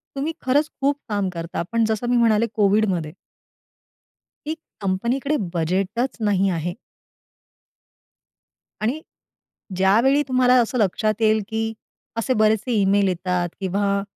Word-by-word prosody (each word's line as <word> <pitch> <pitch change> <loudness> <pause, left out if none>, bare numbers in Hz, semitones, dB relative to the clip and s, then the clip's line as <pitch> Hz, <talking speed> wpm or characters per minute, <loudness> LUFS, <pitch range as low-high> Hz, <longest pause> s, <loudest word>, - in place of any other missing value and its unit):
तुम्ही 290 +4 -2
खरंच 290 +4 +2
खूप 285 +1 +2
काम 205 -3 0
करता. 170 0 -4
पण 230 -1 +2
जसं 220 +2 -1
मी 245 - +3
म्हणाले 230 -1 +3
कोविडमध्ये 195 -6 +1 1.3
की 310 - -1 0.3
कंपनीकडे 240 +10 0 0.2
बजेटचं 195 +9 -1
नाही 195 -1 +2
आहे. 175 0 -2 2.1
आणि 255 +9 -1 0.8
ज्यावेळी 230 +10 +4
तुम्हाला 255 -1 +4
असं 250 +2 -3
लक्षात 215 +1 +1
येईल, 220 -1 +3
की 220 0 -2 0.4
असे 230 +3 0
बरेचसे 220 +2 +2
ईमेल 200 -1 +3
येतात 180 -1 -1
किंवा 200 +1 0
215 Hz, 115 wpm, -22 LUFS, 190-245 Hz, 2.1 s, ज्यावेळी